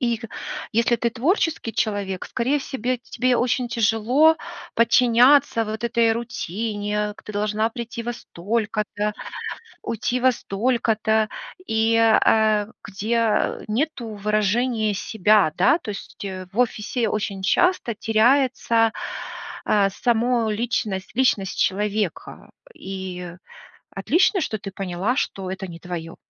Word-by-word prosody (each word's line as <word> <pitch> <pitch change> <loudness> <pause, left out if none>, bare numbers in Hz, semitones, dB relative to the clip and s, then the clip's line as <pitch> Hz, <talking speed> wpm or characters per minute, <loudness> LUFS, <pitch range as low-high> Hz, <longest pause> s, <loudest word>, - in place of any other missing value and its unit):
И, 235 -2 +1
х 230 -1 -9 0.5
если 235 +1 +3
ты 235 +1 0
творческий 295 - 0
человек, 200 -4 -2
скорее 265 +5 0
в 275 - -7
себе, 255 -1 -2
тебе 255 -1 +2
очень 245 0 0
тяжело 240 +7 +3 0.4
подчиняться 235 +2 +5
вот 220 +2 -5
этой 235 -1 +3
рутине, 210 -2 -3
к - - -15
ты 215 - -9
должна 210 +2 0
прийти 235 0 -6
во 240 +1 -3
столько-то, 210 +1 -2 0.7
уйти 240 +3 -2
во 260 +1 +4
столько-то, 220 -1 0 0.4
и, 225 +1 +2
э, 225 -1 +5
а, 215 -1 +3
где, 210 +2 -3
а, 225 -2 +1
нету 255 +1 -1 0.2
выражения 215 +1 +1
себя. 210 -4 +3
Да, 310 - +4
то 220 - -7
есть, 200 0 -8
э, 185 -1 -5
в 215 - -8
офисе 235 -1 0
очень 200 -2 -3
часто 355 - +2
теряется, 230 0 +2 0.7
а, 200 -2 +3
само 235 +1 +1
личность 210 -4 -2
личность 210 -7 +1
человека. 205 -1 -1 0.2
И 185 -2 -7 0.6
отлично, 340 - +2
что 220 -8 -2
ты 195 - -6
поняла, 195 +5 -2
что 195 -8 -2
это 190 0 -5
не 170 -1 -9
твоё. 170 -2 -6
220 Hz, 130 wpm, -23 LUFS, 205-240 Hz, 0.7 s, подчиняться